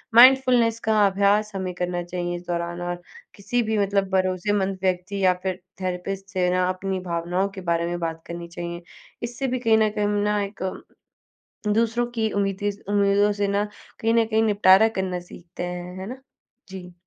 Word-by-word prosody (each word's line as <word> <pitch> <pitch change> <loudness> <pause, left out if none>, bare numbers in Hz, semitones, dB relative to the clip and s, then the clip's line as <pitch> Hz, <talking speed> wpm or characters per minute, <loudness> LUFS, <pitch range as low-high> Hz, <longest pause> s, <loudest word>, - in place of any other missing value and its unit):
Mindfulness 250 -2 +6
का 215 -1 +5
अभ्यास 200 +2 +2
हमें 185 -1 -3
करना 180 0 -2
चाहिए, 175 0 -3
इस 175 - -6
दौरान 175 0 -3
और 175 0 -4 0.3
किसी 240 +4 -1
भी 220 0 -1
मतलब 200 -1 +1
भरोसेमंद 190 +1 +1
व्यक्ति 185 +1 -1
या 185 - +5
फिर 190 -1 -2 0.2
थेरेपिस्ट 190 +2 -4
से 180 -2 +2
ना, 180 0 +2
अपनी 190 0 -2
भावनाओं 175 +2 -1
के 190 - -6
बारे 170 0 +1
में 175 - -2
बात 165 -1 -3
करनी 170 0 -6
चाहिए। 170 0 -6 0.4
इससे 240 +3 -3
भी 255 0 -1
कहीं 225 -2 +4
न 215 -1 +3
कहीं 210 -1 -1
ना, 210 0 +1
एक 200 -1 -6 1.0
दूसरों 230 +3 +2
की 220 -1 +1
उम्मीदिस 200 0 -1
उम्मीदों 205 0 +3
से 200 - +2
ना, 200 +1 0 0.3
कहीं 225 +1 +1
न 230 -1 +4
कहीं 220 0 +2
निपटारा 205 0 +6
करना 185 -1 -1
सीखते 175 0 -10
हैं। 180 +1 -5
है 190 - -6
ना? 260 +1 -8 0.5
जी। 180 -2 -9
195 Hz, 175 wpm, -24 LUFS, 180-210 Hz, 1.0 s, Mindfulness